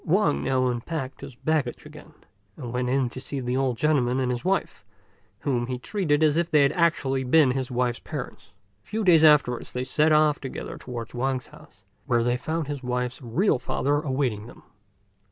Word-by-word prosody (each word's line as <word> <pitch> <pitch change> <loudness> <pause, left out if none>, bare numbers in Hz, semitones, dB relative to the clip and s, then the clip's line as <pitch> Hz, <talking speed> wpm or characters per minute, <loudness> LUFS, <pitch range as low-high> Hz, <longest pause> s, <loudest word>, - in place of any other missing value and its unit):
Wang 180 -2 +2
now 130 -1 +1
unpacked 130 +2 -3
his 130 - -9
baggage 145 -2 -1
again, - - -13 0.4
and 120 -4 -7
went 125 0 -1
in 130 0 +1
to 130 - -8
see 140 +1 -5
the 125 0 -2
old 130 -3 0
gentleman 130 -4 +2
and 125 -1 0
his 120 -1 -3
wife, 190 - -1 0.6
whom 120 -4 -1
he 130 -1 -3
treated 155 - 0
as 155 0 +3
if 170 0 +1
they 150 -2 +5
had 140 - +3
actually 150 -6 +1
been 135 +1 +4
his 130 -1 -2
wife's 125 -1 -1
parents. - - -7 0.3
A - - -32
few 220 +1 -2
days 170 -5 +5
afterwards 145 -6 +4
they 125 - -2
set 150 +4 +2
off 150 -1 +4
together 135 - -7
towards 120 -2 -7
Wang's 130 +1 -1
home, - - -15 0.4
where 120 -1 +2
they 120 +1 +1
found 160 +5 -3
his 145 -1 -5
wife's 125 +1 -3
real 130 - +1
father 140 +3 0
awaiting 130 -7 -2
them. - - -14
135 Hz, 190 wpm, -25 LUFS, 125-150 Hz, 0.6 s, they